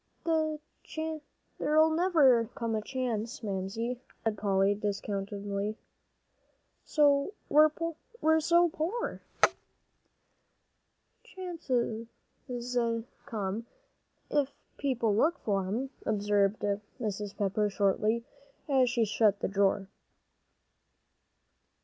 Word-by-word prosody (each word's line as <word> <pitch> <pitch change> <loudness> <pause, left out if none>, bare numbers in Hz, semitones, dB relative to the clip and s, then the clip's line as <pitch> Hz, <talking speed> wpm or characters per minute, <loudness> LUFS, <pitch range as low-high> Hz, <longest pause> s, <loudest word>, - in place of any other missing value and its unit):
"There 315 -2 +1 1.0
never'll 315 -6 +4
come 230 -4 -2
a 215 - 0
chance, 240 0 -3
Mamsie," 220 +5 -3 0.2
said 225 -2 +1
Polly, 195 -1 +2
disconsolately, 200 0 -3 1.2
"we're 310 - +3
so 340 +2 +4
poor." 405 +10 -2 2.0
"Chances 260 -11 -2 1.2
come, 210 +1 -3 0.6
if 285 -2 +2 0.3
people 240 -7 +1
look 315 +10 +3
for 195 -3 -1
'em," 250 +7 -2
observed 205 -1 +2 0.4
Mrs. 210 -3 -3
Pepper, 205 +1 +1
shortly, 210 +3 +1 0.4
as 265 -4 +4
she 235 -2 +2
shut 210 -1 +3
the - - +1
drawer. 195 0 +2
230 Hz, 75 wpm, -30 LUFS, 205-295 Hz, 2.0 s, never'll